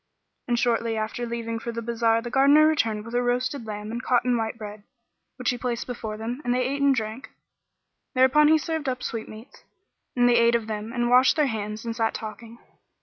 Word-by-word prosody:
And 240 -1 +1
shortly 230 -1 0
after 220 +2 -3
leaving 230 -1 -4
for 235 - -5
the 230 0 -5
bazar 230 0 +1
the 240 - -6
Gardener 280 +4 +6
returned 225 -9 +1
with 230 - -9
a 245 - +2
roasted 245 0 -1
lamb 210 0 -5
and 235 +1 -4
cotton 250 -1 +2
white 225 0 -2
bread, 210 -1 -8 0.5
which - - -1
he 245 - -5
placed 240 -1 -3
before 220 -3 -5
them, 235 +5 -5
and 245 0 0
they 255 - +1
ate 280 +1 -3
and 280 -1 +4
drank; 220 +2 -4 0.9
thereupon 260 +4 +5
he 315 +1 +6
served 315 -2 -3
up 255 -1 -4
sweetmeats, 225 +2 -7 0.5
and 245 -1 +4
they 240 -1 +4
ate 235 0 +4
of 230 -2 0
them, 215 0 -5
and 240 -1 -1
washed 255 +1 +6
their 305 -2 +3
hands 215 -2 -4
and 230 -1 -3
sat 225 -1 0
talking. 225 +1 -8
235 Hz, 205 wpm, -25 LUFS, 225-255 Hz, 0.9 s, Gardener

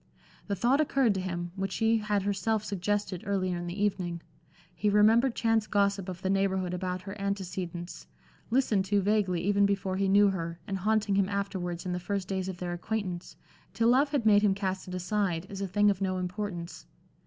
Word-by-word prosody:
The 200 - -1
thought 255 +8 +3
occurred 270 -7 +2
to 190 - -2
him, 175 -1 -4
which 195 -1 -3
she 225 0 +2
had 210 -2 0
herself 205 +2 0
suggested, 205 -2 -2
earlier 185 -2 -1
in 175 - -5
the 175 +3 -5
evening. 175 -4 -1 0.5
He 210 - 0
remembered 225 +5 +4
chance 225 -2 +1
gossip 200 -2 +1
of 180 0 -7
the 190 - 0
Neighborhood 190 -2 0
about 180 0 -3
her 195 +1 -7
antecedents, 180 - -4 0.4
listened 225 -5 +2
to 205 +1 +2
vaguely 195 -3 +1
even 200 +2 +3
before 195 -1 -1
he 195 0 +1
knew 200 +1 +6
her, 170 -3 -4
and 195 -1 -3
haunting 215 +1 +1
him 195 0 +2
afterwards 190 -4 -3
in 180 - -2
the 180 - -2
first 195 +1 -3
days 190 -1 -2
of 185 - -5
their 175 0 -4
acquaintance, 180 -1 -4 0.4
till 230 +2 +3
love 270 +4 +4
had 280 -6 -1
made 205 -1 +6
him 205 -2 +3
cast 190 -2 -3
it 180 - -5
aside, 180 -2 -1
as 195 -1 -6
a 195 - -1
thing 205 +2 +3
of 195 -1 -4
no 185 -1 0
importance. 180 - -5
195 Hz, 200 wpm, -29 LUFS, 180-210 Hz, 0.5 s, knew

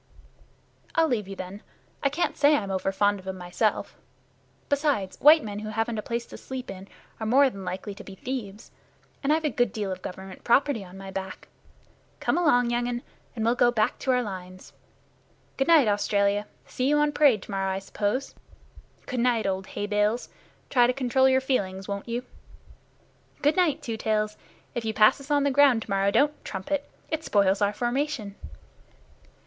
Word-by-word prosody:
"I'll 325 -1 +4
leave 225 -8 -1
you, 195 - -7
then. 190 +2 -7 0.4
I 280 - +2
can't 315 +6 -1
say 295 +1 +5
I'm 200 -7 -2
over 190 0 -1
fond 205 +1 +2
of 190 - -14
'em 190 0 -4
myself. 180 +5 -1 0.7
Besides, 285 -10 0
white 305 +2 +8
men 205 -1 -5
who 215 0 -6
haven't 225 +1 -1
a - - -2
place 235 +2 -3
to - - -11
sleep 260 -1 -6
in 190 +1 -10 0.3
are 220 - -3
more 270 +3 +5
than 195 -3 -9
likely 190 +3 -5
to - - -11
be 195 - -10
thieves, 220 -2 -6 0.5
and 280 - +1
I've 315 +1 +2
a 300 - +1
good 245 -3 +1
deal 205 -2 -3
of 185 - -5
Government 190 +1 -8
property 255 -2 +2
on 185 0 -12
my 195 0 -8
back. 190 0 -6 0.7
Come - - 0
along, 245 -9 +3
young 240 0 0
un, 240 0 -3 0.3
and 225 -2 -2
we'll 230 - +4
go 245 0 +4
back 220 -3 0
to 265 - -4
our 250 -1 +3
lines. 185 -3 -8 0.8
Good 270 - 0
night, 320 -7 +6
Australia! 205 0 +1 0.2
See 255 - -2
you 295 - +4
on 295 0 +3
parade 280 -9 +4
to - - -10
morrow, 195 -1 -1
I - - -2
suppose. 205 +6 -2 0.7
Good 255 - -3
night, 235 -2 +2
old 190 -1 -2
Hay 205 - -4
bale! 210 +2 +2 0.5
try 245 -2 +5
to 250 - +1
control 265 0 +3
your 260 0 +3
feelings, 195 -8 -1
won't 200 +3 -5
you? 240 +2 -3 1.2
Good 295 +2 +4
night, 345 -6 +2
Two 230 -2 -3
Tails! 215 -1 0 0.4
If 240 - -3
you 220 -1 -2
pass 215 +6 +5
us 275 - -12
on 290 -1 +3
the 280 - +2
ground 265 -4 +5
tomorrow, 195 -1 +1
don't 290 +8 +1
trumpet. 285 +10 -3 0.2
It 320 0 -1
spoils 200 -6 +2
our 205 0 +3
formation." 240 -1 -2
225 Hz, 190 wpm, -26 LUFS, 200-265 Hz, 1.2 s, white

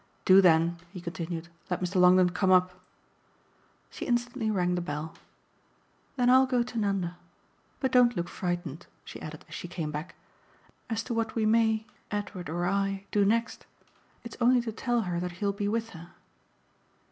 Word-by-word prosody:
Do 190 +1 +8
then," 170 -1 +4
he 180 +1 -9
continued, 170 -1 -5 0.2
"let 180 - -1
Mr. 185 +1 -2
Longdon 180 0 +6
come 190 +1 0
up." 185 0 +5 1.2
She - - -6
instantly 240 -2 0
rang 180 -4 +1
the 175 - -1
bell. 160 -2 -5 1.0
"Then 250 -2 +1
I'll 260 +1 +6
go 250 -2 +2
to 240 -1 -5
Nanda. 195 -4 -1 0.6
But 265 -2 0
don't 245 -2 +4
look 175 0 -1
frightened," 175 -4 -4 0.2
she - - -9
added 155 -1 -8
as - - -13
she - - -6
came 170 -3 -4
back, 150 +4 -6 0.7
"as 225 -1 -1
to 245 - -4
what 225 -1 -2
we 220 -2 +1
may 220 0 +3 0.2
Edward 205 -4 -4
or 175 +2 -2
I 195 +1 -1
do 205 - +3
next. 230 +3 0 0.6
It's 235 - -9
only 245 +1 +5
to 235 -1 -4
tell 240 +2 0
her 180 -4 -2
that 180 0 -4
he'll 200 +3 -1
be 200 +1 -2
with 225 +2 -1
her." 170 +1 -12
195 Hz, 170 wpm, -28 LUFS, 175-230 Hz, 1.2 s, Do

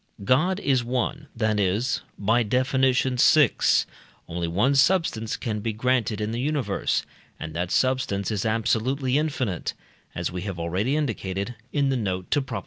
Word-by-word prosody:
God 155 - +2
is 130 -7 +1
one, 130 +4 -2
that 110 -2 +1
is 105 +3 0 0.2
(by 115 +4 +2
Def. 125 +4 0
vi.) 130 +1 +4 0.8
only 85 0 -3
one 105 +12 +2
substance 140 - +2
can 110 -4 -3
be 110 +1 -2
granted 115 -2 0
in 105 +1 -2
the 120 +1 -2
universe, 145 -1 -1 0.3
and 80 0 -6
that 90 +1 -2
substance 130 -6 0
is 105 -3 -1
absolutely 125 +5 +1
infinite, 135 - -2 0.4
as - - -2
we 90 0 -4
have 95 -2 -5
already 90 - -1
indicated 105 -7 -2 0.2
(in 140 -2 +1
the 135 - +1
note 95 -5 -3
to 145 - +3
Prop. 125 -6 -4
120 Hz, 155 wpm, -25 LUFS, 100-130 Hz, 0.8 s, vi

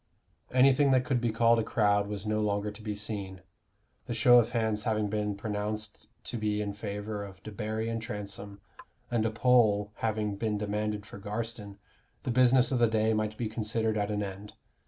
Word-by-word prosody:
Anything 135 +2 +5
that 130 -1 +3
could 125 -2 0
be 120 -2 +1
called 115 +1 +4
a - - +1
crowd 100 -2 +2
was 105 -1 -5
no 110 0 0
longer 105 0 0
to 105 +2 -12
be 105 -1 -4
seen. 100 -3 -5 0.7
The 120 - -3
show 120 +2 +7
of 115 -1 +1
hands 110 -3 0
having 105 -2 0
been 105 -1 -1
pronounced 105 +1 -4 0.2
to 120 - -4
be 105 -1 0
in 105 -1 -2
favor 105 0 -5
of 95 -2 -11
Debarry 110 +1 -3
and 115 0 -2
Transome, 100 -2 -7 0.5
and 115 -2 +2
a - - 0
poll 110 -3 +3
having 105 -2 -1
been 105 -1 -1
demanded 105 0 -2
for 100 - -10
Garstin, 105 0 -5 0.5
the 125 - -1
business 125 +1 +4
of 130 - +1
the 120 - +5
day 110 0 +2
might 110 0 -1
be 120 - -2
considered 110 0 -1
at 105 -1 0
an 105 -1 -1
end. 100 +1 -7
110 Hz, 190 wpm, -29 LUFS, 105-115 Hz, 0.7 s, show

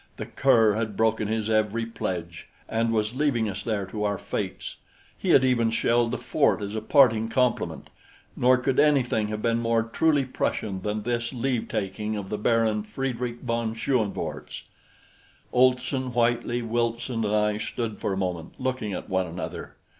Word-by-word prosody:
The - - -4
cur 115 -6 +4
had 110 -2 -3
broken 110 -1 +2
his 110 0 -1
every 110 +1 +1
pledge 85 -7 -5 0.2
and 115 +1 0
was 110 0 0
leaving 130 -5 +1
us 100 -1 -4
there 105 -2 -2
to 105 +2 -5
our 100 -1 0
fates. - - -5 0.4
He - - -4
had 130 - +6
even 120 -3 +3
shelled 115 +1 +2
the - - -2
fort - - +1
as 100 +1 -4
a 110 - -2
parting 115 -3 +4
compliment; 125 -1 0 0.4
nor 125 +1 +4
could 125 +1 0
anything 130 -7 +3
have 105 0 -4
been 115 0 +2
more 115 -1 +1
truly 140 +5 +2
Prussian 100 -6 -2
than 105 +1 -2
this 120 +1 -2
leave 125 -1 -1
taking 105 +1 -3
of 95 -2 -6
the 105 - -3
Baron 110 -1 +2
Friedrich 120 +2 -4
von 115 -2 -2
Schoenvorts. 115 -3 -2 0.9
Olson, 130 +1 +2
Whitely, 120 0 +1
Wilson, 115 +1 -1
and 105 0 +1
I 105 0 +1
stood 115 -1 -4
for - - -1
a 95 - -1
moment 90 -4 -3
looking 130 -5 -2
at - - -5
one 95 -1 0
another. 85 +2 -6
115 Hz, 170 wpm, -26 LUFS, 105-120 Hz, 0.9 s, had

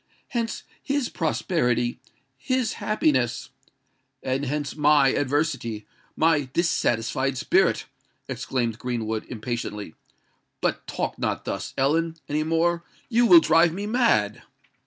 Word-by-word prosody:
Hence 230 -2 -2 0.2
his 280 -3 -1
prosperity—his 135 - -1
happiness——" 130 - 0 0.7
"And 130 +2 -1
hence 145 +1 -3
my 150 -2 +5
adversity—my 145 +1 -1
dissatisfied 130 -5 0
spirit!" - - +2 0.4
exclaimed 120 -3 -2
Greenwood, 110 -3 -3
impatiently. 105 -5 -5 0.7
"But - - -2
talk - - -3
not - - -2
thus, - - -4
Ellen, 160 +5 +1
any 150 +1 0
more: 165 +2 +1 0.3
you 240 0 +4
will 335 +4 +9
drive 165 - +4
me 200 +3 -4
mad!" 210 - +2
145 Hz, 100 wpm, -25 LUFS, 120-170 Hz, 0.7 s, will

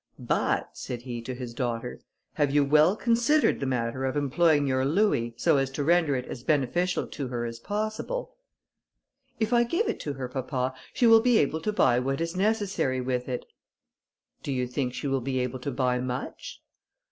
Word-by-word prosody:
"But," - - 0
said 120 -1 -6
he 120 -2 -5
to 125 +2 -5
his 125 -2 -7
daughter, 120 -1 -3 0.3
"have 145 -2 +1
you 145 0 +3
well 155 +6 +5
considered 240 +7 +2
the 135 - -2
manner 125 0 -1
of 130 +2 -1
employing 145 +1 +3
your 130 -1 +1
louis, 140 - +1
so - - +3
as 135 -1 +1
to 145 - -2
render 165 -2 +3
it 125 -1 -3
as 120 - -7
beneficial 155 +6 +1
to 140 - -5
her 120 -1 -3
as 115 0 -6
possible?" 215 - -3 1.1
"If 220 +1 0
I 240 - +5
give 340 - 0
it - - -2
to 145 - -4
her, 130 -2 -5
papa, 130 0 -2 0.2
she 245 - +1
will 225 -1 +7
be 245 -1 +4
able 160 0 +1
to 215 - -1
buy 125 -11 +3
what 135 +2 -1
is 165 +1 -2
necessary 195 -9 0
with 125 0 -2
it." 125 - -3 1.0
"Do - - -4
you 125 -1 0
think 125 0 -3
she - - -5
will 135 -1 0
be 130 +1 -2
able 125 0 -2
to 135 - -4
buy 125 -1 0
much?" 125 +1 -5
135 Hz, 195 wpm, -27 LUFS, 125-175 Hz, 1.1 s, will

